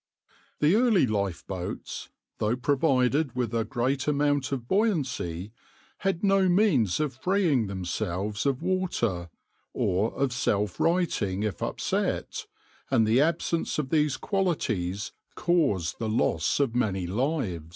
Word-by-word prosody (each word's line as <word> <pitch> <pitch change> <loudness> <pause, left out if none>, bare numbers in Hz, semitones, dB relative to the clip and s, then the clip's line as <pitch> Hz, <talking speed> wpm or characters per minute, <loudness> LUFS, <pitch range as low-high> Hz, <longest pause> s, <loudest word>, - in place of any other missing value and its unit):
The 150 +4 +5
early 220 - +4
lifeboats, 100 -4 -4 0.3
though 110 +3 +1
provided 135 0 +1
with 120 -3 -1
a 115 -1 +1
great 130 +4 -1
amount 145 -2 +1
of 125 -4 -3
buoyancy, 130 - 0 0.5
had 190 -2 -1
no 195 -2 +4
means 165 - +3
of 150 -3 0
freeing 155 - +1
themselves 100 +4 -2
of 135 +2 0
water, 120 - -1 0.4
or 100 +5 +1
of 135 -2 0
self 105 -6 0
righting 120 - +1
if 105 -2 -3
upset, - - -2 0.4
and 110 - +3
the 115 +5 +4
absence 165 +1 0
of 145 -3 -2
these 150 -4 +2
qualities 110 - -1 0.2
caused 140 - +1
the 110 - -2
loss 110 - +1
of 135 -5 +1
many 100 -7 0
lives. 100 - -2
130 Hz, 125 wpm, -27 LUFS, 105-160 Hz, 0.5 s, The